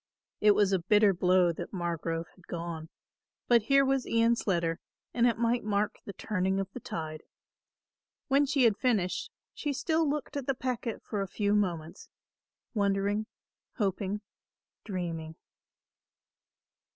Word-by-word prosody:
It 210 -1 +5
was 205 -2 +3
a 190 - +3
bitter 205 +3 +4
blow 180 -1 +3
that 170 +2 -7
Margrove 170 -1 -2
had 180 - -21
gone; 165 -2 -5 0.6
but 240 -1 +5
here 275 +5 +4
was 270 -1 +1
Ian's 230 0 +2
letter 170 -3 +1 0.3
and 240 0 +4
it 235 - +1
might 235 +1 +1
mark 210 0 0
the 200 - -6
turning 190 -2 -1
of 195 - -1
the - - -6
tide. 155 -7 -5 1.1
When 280 0 +3
she 275 -1 +2
had 220 -4 +4
finished 210 -8 0 0.2
she 295 -1 -2
still 320 +2 +1
looked 295 +1 -3
at 280 -3 -3
the 275 - +1
packet 245 -3 -3
for 205 -3 -2
a 195 - -2
few 205 +2 0
moments, 175 -4 -1 0.6
wondering, 200 0 +1 0.5
hoping, 200 -2 -1 0.6
dreaming. 165 -5 -4
205 Hz, 140 wpm, -30 LUFS, 175-235 Hz, 1.1 s, It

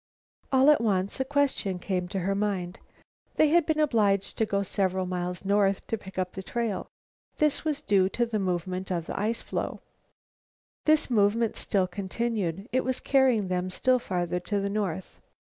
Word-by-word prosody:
All 265 +2 +6
at 300 - +3
once 200 0 0
a - - +2
question 275 -9 0
came 180 0 -2
to 190 +1 -3
her 195 +3 0
mind. 195 -3 -2 0.6
They 310 - +4
had 335 0 +3
been 315 -1 +1
obliged 210 -9 +2
to 220 - +2
go 200 -1 0
several 190 -1 0
miles 180 0 -4
north 200 -1 +2
to - - -1
pick 190 -3 -12
up 185 -1 -1
the 190 - -6
trail. 225 0 -3 0.5
This 300 -2 +2
was 305 -2 -1
due 195 -5 +3
to 240 +4 0
the 225 -2 -2
movement 185 0 -2
of 170 -3 -1
the 215 +6 -1
floe. - - -3 1.1
This 310 -3 +3
movement 220 +1 +2
still 195 -2 +1
continued. 195 0 -3
It 255 +1 +1
was 260 0 -1
carrying 260 -7 +3
them 180 0 -1
still 255 +7 +2
farther 180 -5 -2
to 200 +3 -2
the 200 0 -2
north. 190 -4 -3
200 Hz, 175 wpm, -27 LUFS, 185-235 Hz, 1.1 s, All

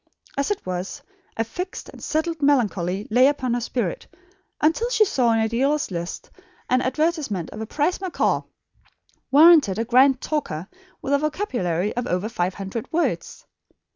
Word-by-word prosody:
As 280 0 -1
it 415 - -2
was, 180 +1 -4 0.3
a 225 - +2
fixed 360 +11 -6
and - - -12
settled 320 0 -1
melancholy 205 -9 +1
lay 250 +4 +6
upon 260 -4 0
her 245 - -1
spirit 225 -6 -3 0.5
until 330 +11 +2
she 450 -3 +4
saw 250 - +2
in 225 - +2
a 220 - +2
dealer's 275 +4 0
list 170 0 -5 0.4
an 255 0 +4
advertisement 265 - -1
of 215 - -7
a 220 - -5
prize 310 - 0
macaw, 375 -3 0 0.9
warranted 295 - +6
a 225 - -1
grand 255 +2 +5
talker, 195 - -3 0.4
with 275 - -1
a 280 - +4
vocabulary 240 - -1
of 245 0 -2
over 180 +4 -1
five 180 -4 -2
hundred 200 +5 -6
words. 340 +1 -2
255 Hz, 160 wpm, -23 LUFS, 205-305 Hz, 0.9 s, lay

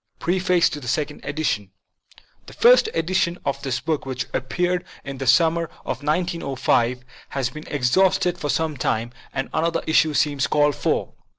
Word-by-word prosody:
PREFACE 180 -1 +2
TO 150 - -6
THE 125 - -9
SECOND 150 +3 -2
EDITION 145 -10 -2 0.8
THE - - -11
first 475 -1 +5
edition 175 0 0
of 140 0 -2
this 130 -3 -2
book, 155 +3 -2
which 130 -1 -4
appeared 180 +7 -1 0.2
in 135 -1 -7
the 135 - -3
summer 165 +7 +4 0.2
of 130 - -3
1905, 140 -6 0 0.3
has 130 -3 -2
been 155 +3 -10
exhausted 175 +7 +2
for 150 - -3
some 160 -2 0
time, 115 -1 -1 0.2
and 135 -1 -3
another 165 +1 0
issue 160 -1 +3
seems 145 -2 +1
called 145 0 +3
for. - - -1
150 Hz, 160 wpm, -23 LUFS, 130-170 Hz, 0.8 s, first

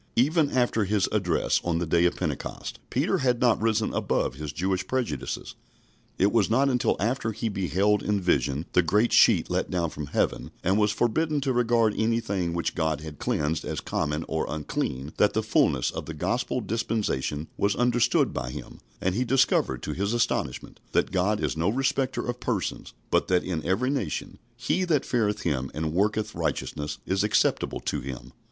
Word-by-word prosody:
Even 150 +4 +3
after 120 -5 +1
his 100 0 +1
address - - +1
on 85 -1 0
the 85 - -1
day 85 +2 +3
of 90 - +2
Pentecost, - - -4
Peter 175 +8 +1
had 125 -3 +1
not 120 -4 +3
risen 110 -1 +1
above - - 0
his 75 +2 -6
Jewish 95 +4 -1
prejudices. 130 -2 -3 0.6
It 100 +2 +3
was 110 -4 +2
not 135 +5 +3
until 125 -2 +2
after 115 +2 0
he 115 +1 -2
beheld 100 +1 +1
in 105 -1 0
vision 70 -4 +1
the 90 - +5
great 105 +8 +2
sheet - - +5
let - - 0
down 85 -3 -1
from 75 -1 -6
heaven, - - -1
and 95 +4 +2
was 105 0 +3
forbidden 150 +8 +1
to 135 -1 0
regard 115 -3 +3
anything 105 -6 0
which 85 - -1
God 80 -2 -1
had 75 -2 -9
cleansed 75 +2 -1
as - - -3
common 75 +1 -2
or 80 0 -1
unclean, 75 -2 -3
that - - +3
the - - 0
fulness - - +2
of - - -6
the - - -6
Gospel - - -1
dispensation 105 - -1
was 100 +1 +1
understood 120 -1 +2
by - - -3
him, - - -8 0.2
and 95 - +1
he 120 +6 +1
discovered 115 - +2
to - - -3
his 100 +4 -1
astonishment 120 -1 -1
that - - +2
God 100 +3 +1
is - - -1
no 80 +4 +1
respecter 135 +2 0
of 120 0 -3
persons, 115 -7 -3 0.2
but - - +2
that 90 -1 +2
in 85 -4 -3
every 115 +9 +1
nation 140 -2 -3 0.2
he 125 +10 0
that 160 -6 +1
feareth 110 -4 0
Him 65 -5 -1
and 80 0 -2
worketh 105 +4 0
righteousness 75 0 -3
is 95 +1 +1
acceptable 105 0 +1
to - - -2
Him. 65 -1 -7
105 Hz, 185 wpm, -26 LUFS, 85-120 Hz, 0.6 s, the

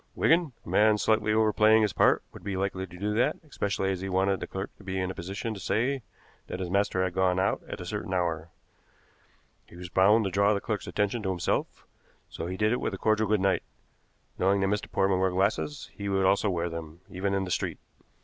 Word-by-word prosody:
Wigan, 165 -4 +3
a - - -9
man 105 0 +4
slightly 110 0 +2
overplaying 110 0 +4
his 105 - 0
part - - +3
would - - -12
be 100 -1 -3
likely 95 0 -2
to 90 0 -12
do 105 +3 -1
that, 125 +7 +2
especially 100 -7 -1
as 95 -1 -3
he 95 - -4
wanted 95 +1 +1
the - - -5
clerk 95 +1 -6
to - - -16
be 95 0 -3
in 95 0 -1
a - - -6
position 100 +6 -4
to 100 - -8
say 120 +9 0 0.5
that 90 - -5
his 90 -2 -4
master 100 -1 +1
had 95 -1 -1
gone 95 0 +2
out 95 +1 +1
at - - -6
a - - -6
certain - - -4
hour. 85 -3 -1 1.2
He - - -15
was 90 0 -8
bound 100 +5 +4
to 95 - -1
draw 100 +2 +3
the - - 0
clerk's 105 0 -3
attention 105 +3 -1
to 95 - -2
himself, 90 -2 -2 0.5
so 80 - -5
he 90 +1 -4
did 105 +1 +2
it 125 - 0
with 95 - -2
a - - -8
cordial 110 +1 +2
good 105 -1 +2
night. 95 0 +2 0.8
Knowing 100 +2 +3
that - - +2
Mr. 105 - -4
Portman 95 -1 +2
wore 95 0 +3
glasses, 100 +10 -1
he 100 -1 -5
would 95 -1 +2
also 100 +2 +3
wear 85 -2 -1
them, 80 0 -7
even 100 +2 -2
in 95 - 0
the 90 - -5
street." - - -1
95 Hz, 230 wpm, -28 LUFS, 95-105 Hz, 1.2 s, man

